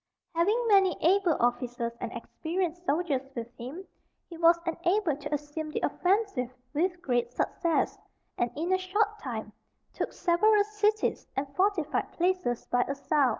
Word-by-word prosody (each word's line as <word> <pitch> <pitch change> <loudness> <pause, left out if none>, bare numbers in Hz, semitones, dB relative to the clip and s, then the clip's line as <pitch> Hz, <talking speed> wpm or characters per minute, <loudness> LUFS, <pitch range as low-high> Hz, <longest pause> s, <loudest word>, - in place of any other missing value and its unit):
Having 415 +9 +2
many 390 -5 +5
able 360 -1 +4
officers 240 -1 0
and 235 - -3
experienced 345 +7 -3
soldiers 295 -3 +1
with 235 0 -6
him, 275 +11 -7 0.5
he - - -6
was 335 +1 +5
enabled 340 -2 0
to - - -5
assume 295 +1 -3
the - - -3
offensive 375 - +1 0.2
with 355 +4 0
great 240 -4 0
success, 330 +6 0 0.4
and 240 - 0
in 335 +5 0
a 375 - +3
short 415 +3 0
time 220 - -5 0.4
took - - -2
several 410 +4 +4
cities 425 +1 0
and 275 +1 -3
fortified 370 -5 +1
places 355 -9 0
by 245 - +2
assault. 280 0 +2
335 Hz, 145 wpm, -29 LUFS, 270-375 Hz, 0.5 s, many